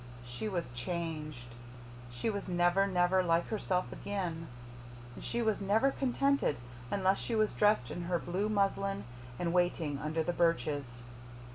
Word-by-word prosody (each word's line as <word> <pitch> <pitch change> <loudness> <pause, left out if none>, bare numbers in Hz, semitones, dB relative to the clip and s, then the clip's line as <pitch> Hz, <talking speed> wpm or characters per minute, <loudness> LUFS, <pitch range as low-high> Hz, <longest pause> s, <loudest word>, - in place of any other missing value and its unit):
She 120 - -4
was 175 -4 -1
CHANGED. 150 -3 -4 0.6
She 120 - -3
was 200 -1 -4
never, 175 +2 +3
never 185 0 +3
like 170 -1 +2
herself 185 -4 -1
again; 175 -5 -3 0.7
and - - -10
she 235 0 -1
was 220 -2 +1
never 220 +7 +3
contented 275 - +1 0.3
unless 190 -1 +2
she 235 - -2
was 215 -1 +3
dressed 210 - +3
in 175 - -4
her 175 0 +1
blue 185 +5 -1
muslin 195 -1 +1 0.3
and 170 -1 -1
waiting 170 -5 +1
under 155 +2 -1
the 175 - -1
birches. 145 -7 0
175 Hz, 145 wpm, -32 LUFS, 160-200 Hz, 0.7 s, never